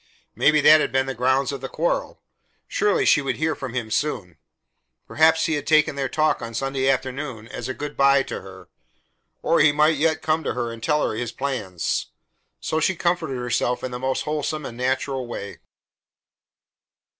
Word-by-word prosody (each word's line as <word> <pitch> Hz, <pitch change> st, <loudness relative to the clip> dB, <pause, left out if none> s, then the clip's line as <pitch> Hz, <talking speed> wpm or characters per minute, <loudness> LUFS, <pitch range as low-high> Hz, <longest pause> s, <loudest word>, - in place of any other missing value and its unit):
Maybe 150 Hz, 0 st, +4 dB
that 155 Hz, +1 st, +7 dB
had -, -, -1 dB
been 130 Hz, +1 st, +1 dB
the 135 Hz, -, -3 dB
grounds 130 Hz, +2 st, +1 dB
of 140 Hz, -2 st, -6 dB
the 135 Hz, -, -5 dB
quarrel. 170 Hz, +2 st, -2 dB, 0.4 s
Surely 420 Hz, 0 st, +1 dB
she 150 Hz, -, +5 dB
would 135 Hz, -, -2 dB
hear 155 Hz, 0 st, 0 dB
from 130 Hz, -4 st, -7 dB
him 115 Hz, -3 st, -3 dB
soon. 105 Hz, -, -2 dB, 0.7 s
Perhaps 160 Hz, +1 st, +3 dB
he 160 Hz, -, 0 dB
had 145 Hz, -2 st, -3 dB
taken 155 Hz, -2 st, +4 dB
their 135 Hz, -2 st, -2 dB
talk 155 Hz, +3 st, +1 dB
on 115 Hz, 0 st, -6 dB
Sunday 135 Hz, +1 st, 0 dB
afternoon 130 Hz, -3 st, -2 dB
as 125 Hz, 0 st, -6 dB
a 130 Hz, -, -3 dB
good 150 Hz, 0 st, -6 dB
by 140 Hz, 0 st, +4 dB
to -, -, -6 dB
her; 95 Hz, 0 st, -12 dB, 0.8 s
or 165 Hz, -, +3 dB
he 145 Hz, 0 st, +6 dB
might 150 Hz, +1 st, +3 dB
yet 160 Hz, +1 st, +1 dB
come 160 Hz, 0 st, +1 dB
to -, -, -2 dB
her 120 Hz, -2 st, -2 dB
and 115 Hz, 0 st, -9 dB
tell 150 Hz, +5 st, +1 dB
her -, -, -3 dB
his 115 Hz, 0 st, -3 dB
plans. 115 Hz, -12 st, -3 dB, 0.5 s
So 155 Hz, -, -1 dB
she 185 Hz, +4 st, +1 dB
comforted 170 Hz, -6 st, -1 dB
herself 125 Hz, 0 st, -1 dB
in 130 Hz, -, -3 dB
the 125 Hz, -, -5 dB
most 130 Hz, +1 st, -1 dB
wholesome 150 Hz, 0 st, -3 dB
and 115 Hz, -, -7 dB
natural 130 Hz, +1 st, -2 dB
way. 100 Hz, -4 st, -7 dB
135 Hz, 190 wpm, -23 LUFS, 125-155 Hz, 0.8 s, that